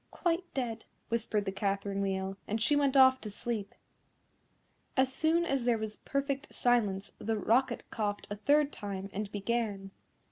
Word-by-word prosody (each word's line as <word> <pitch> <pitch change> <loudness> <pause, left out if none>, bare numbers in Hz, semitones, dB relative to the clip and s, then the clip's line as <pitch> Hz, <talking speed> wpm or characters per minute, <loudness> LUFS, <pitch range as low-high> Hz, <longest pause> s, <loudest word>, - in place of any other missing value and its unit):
"Quite 350 +1 -1
dead," 235 -4 -2 0.2
whispered 220 -3 0
the 190 - -1
Catherine 200 0 -1
Wheel, 190 0 -1
and 215 +2 -1
she 265 +7 +3
went 280 -1 +3
off 260 0 +7
to 215 - -5
sleep. 210 -1 -4 1.2
As 260 0 +3
soon 325 +4 +3
as 270 -6 0
there 240 -2 +3
was 215 -1 -4
perfect 275 +1 -2
silence, 210 -6 +1
the 220 +1 -1
Rocket 235 +4 +2
coughed 205 -2 -2
a - - -1
third 290 +7 +3
time 195 -1 -5
and 205 +1 -3
began. 205 -2 -2
225 Hz, 155 wpm, -31 LUFS, 200-265 Hz, 1.2 s, off